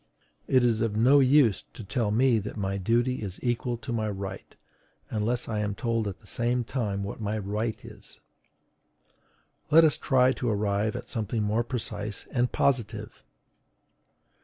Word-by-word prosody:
It 130 -1 +4
is 115 -2 +2
of 115 -2 0
no 130 +6 +6
use 135 -5 +4
to 115 - -8
tell 110 +1 -1
me 120 +2 +3
that 105 +2 -7
my 100 -1 -2
duty 120 +6 +1
is 95 -3 -6
equal 120 0 -1
to 115 +1 -6
my 110 -2 -1
right, 100 -1 -7 0.6
unless 115 +3 -1
I 110 -2 -2
am 105 -1 -2
told 115 -2 -1
at 95 - -6
the - - -20
same 120 +1 0
time 105 -5 -2
what 100 +3 -6
my 105 +1 -2
right 105 +2 -2
is. - - -13 1.5
Let 165 +2 +7
us 155 -2 +3
try 130 -2 +3
to 125 -2 -2
arrive 105 0 0
at - - -6
something 110 -1 -2
more 110 +3 +1
precise 105 -4 -3
and 125 -1 +1
positive. 120 -7 -1
115 Hz, 160 wpm, -27 LUFS, 105-125 Hz, 1.5 s, Let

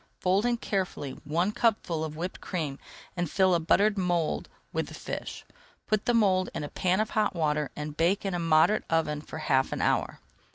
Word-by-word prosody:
Fold 195 +5 +2
in 240 -1 +1
carefully 185 -10 -2
one 170 +7 +1
cupful 210 -8 +1
of 155 -1 -5
whipped 175 +4 -5
cream 155 -7 -3 0.4
and 175 -3 -1
fill 190 +1 +3
a 170 - +3
buttered 200 +5 +3
mould 175 -3 0 0.2
with - - -1
the - - -9
fish. - - -6 0.4
Put 215 -2 0
the 240 - +2
mould 190 -4 +3
in - - -3
a 145 - -5
pan 185 +1 +1
of 215 - 0
hot 215 -3 +1
water 150 -3 0
and 150 0 -5
bake 175 +6 +1
in 195 - -1
a 175 - -1
moderate 165 +5 +4
oven 155 -2 +1
for 155 - -8
half 135 -4 +1
an - - -3
hour. - - 0
175 Hz, 200 wpm, -28 LUFS, 155-195 Hz, 0.4 s, moderate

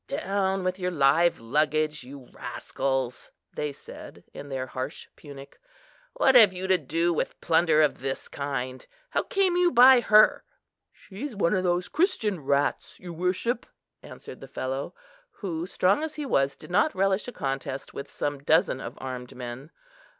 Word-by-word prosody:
"Down 195 -8 -1
with 185 +1 -2
your 180 0 -1
live 165 +2 +3
luggage, 150 +4 0
you 130 0 -12
rascals," 130 -2 -3 0.2
they 150 -1 -3
said, 140 - -12
in 145 - -9
their 130 -1 -3
harsh 130 +3 -6
Punic; 140 -2 -12 0.5
"what 265 - +3
have 220 -6 +7
you 185 +1 -5
to 190 -1 +3
do 165 +4 0
with 155 - -3
plunder 160 -2 +3
of 150 - 0
this 135 0 -4
kind? 130 -2 -4
and - - -22 0.2
how - - +1
came 385 -3 +1
you 355 0 +3
by 250 +1 +8
her?" 215 -1 +5 0.5
"She's 225 +6 -8
one 195 -3 +1
of 185 -2 +1
those 180 0 0
Christian 240 - 0
rats, 140 0 -1
your 175 -1 -8
worship," 185 +8 -1 0.3
answered - - -11
the - - -10
fellow, 135 +1 -4 0.4
who, 175 - -5
strong 190 +7 +2
as 315 -1 -4
he 300 - -4
was, 140 - +1
did - - -13
not 210 +11 +2
relish 195 +3 +1
a - - -5
contest 135 - -4
with 140 - -7
some 145 -1 -3
dozen 145 -2 +2
of - - -7
armed 125 -2 -7
men. 125 +3 -8
165 Hz, 165 wpm, -26 LUFS, 135-195 Hz, 0.5 s, by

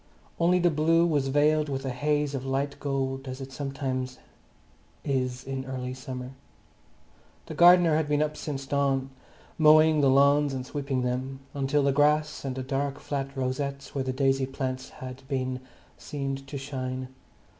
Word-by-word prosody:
Only 175 +2 +4
the 175 -1 +3
blue 165 +2 +3
was 145 -5 +1
veiled 150 +2 +3
with 135 0 -3
a 135 - -1
haze 145 +2 0
of 135 -2 -3
light 135 +1 -2
gold, 135 -1 -2
as 130 +1 -5
it 135 0 -7
is - - -14
sometimes 130 -2 -3 0.9
in 130 -1 -2
early 130 -1 -4
summer. 130 0 -7 1.1
The - - -7
gardener 175 -2 +6
had 160 -2 0
been 150 0 +3
up 150 0 -3
since 140 -3 -5
dawn, 135 -1 0 0.5
mowing 155 0 +6
the 140 - +4
lawns 140 +1 +4
and 130 -1 -4
sweeping 140 -2 -2
them, 130 +2 -3
until 140 +1 +1
the 140 - +3
grass 150 +2 +2
and 135 -2 -3
the 130 - -4
dark 140 +1 -2
flat 140 -1 -4
rosettes 140 +2 -3
where 135 - -1
the 130 - -2
daisy 135 0 +1
plants 130 -1 -4 0.2
had 130 0 -8
been 130 -2 -2 0.4
seemed 135 -1 -4
to 140 - -5
shine. 130 -2 -4
135 Hz, 165 wpm, -27 LUFS, 130-145 Hz, 1.1 s, gardener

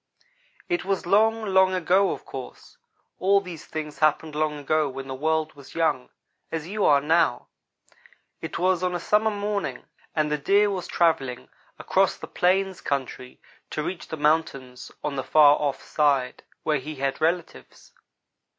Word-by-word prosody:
"It 350 -2 -1
was 195 -2 -2
long, 220 +4 +3
long 190 -1 +3
ago, 185 +2 +3
of - - -5
course. - - -10 0.4
All 200 +2 +4
these 180 -5 -9
things 155 -1 -6
happened 155 0 +1
long 150 0 -1
ago 150 +1 0
when 135 0 -7
the 130 - -5
world 155 +3 -1
was 140 -2 -15
young, 155 -6 0 0.4
as 160 -1 -4
you 205 +2 -2
are 145 - +5
now. 160 -3 +1 0.9
It - - -5
was 185 -1 +1
on 180 -1 -1
a - - -2
summer 210 +5 +2
morning, 205 -1 -3 0.3
and 155 -1 +1
the 150 - 0
Deer 200 +7 +3
was 185 -2 -4
travelling 135 -7 0 0.3
across - - +1
the - - -8
plains 190 +1 0
country 130 -2 -4 0.3
to 150 - -3
reach 180 +2 -5
the 160 - -6
mountains 140 -5 -1
on 145 -2 -3
the 135 - -2
far 145 0 +6
off 140 -2 -2
side, 140 -4 +1 0.2
where 150 -2 +1
he 150 +3 -7
had 135 0 -2
relatives. 165 +1 -3
160 Hz, 160 wpm, -25 LUFS, 145-185 Hz, 0.9 s, far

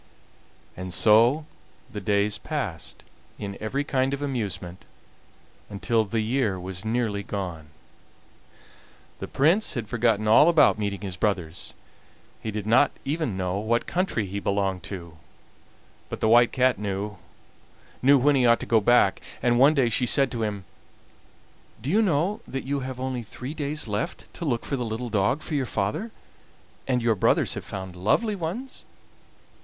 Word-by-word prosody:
And 90 0 -6
so 115 - +4 0.5
the 105 - -5
days 100 0 +1
passed, - - -5 0.3
in 100 -1 -5
every 135 +7 -1
kind 135 -1 0
of 140 - -7
amusement, 105 -9 -4 0.9
until 110 +2 0
the 110 +2 -1
year 110 -4 0
was 90 0 -6
nearly 110 -2 -1
gone. 90 -6 -5 1.5
The - - -5
Prince 170 +10 +2
had 115 -4 -3
forgotten 115 -2 +1
all 115 +9 +7
about 150 -9 +5
meeting 100 -2 -2
his 95 -3 -5
brothers: 90 -6 -2 0.7
he - - -4
did 105 -1 -4
not 120 +6 +5 0.2
even 145 - -2
know 95 +1 -1
what 115 +3 0
country 175 - -1
he 100 +1 -4
belonged 100 -2 -1
to; 85 -5 -8 0.9
but - - -5
the - - +1
White 120 +1 +6
Cat 130 -4 +2
knew 100 0 -3 0.8
when 140 +2 +5
he 125 -3 +4
ought 115 0 +5
to - - -4
go 115 -2 +3
back, 120 +4 +4 0.2
and 120 -1 +3
one 145 +4 +6
day 135 -4 +3
she 125 +2 +1
said 135 +1 +2
to 120 -3 -3
him: 105 -3 -3 1.1
"Do 140 - -3
you 215 +4 +4
know 190 +3 +1
that 135 - -4
you 140 +2 -2
have 130 -1 -6
only 130 -1 -3
three 125 +5 -7
days 150 -2 -3
left 105 -1 -4
to 170 - -6
look 120 -6 -1
for 140 - -2
the 125 - -2
little 115 +2 -4
dog 105 +8 +1
for - - -6
your 135 -4 0
father, 105 - -2 0.8
and 125 -3 +1
your 115 -1 +3
brothers 100 - +2
have - - -6
found 95 -2 -7
lovely 205 - +1
ones?" 200 +10 -5
115 Hz, 160 wpm, -25 LUFS, 100-135 Hz, 1.5 s, all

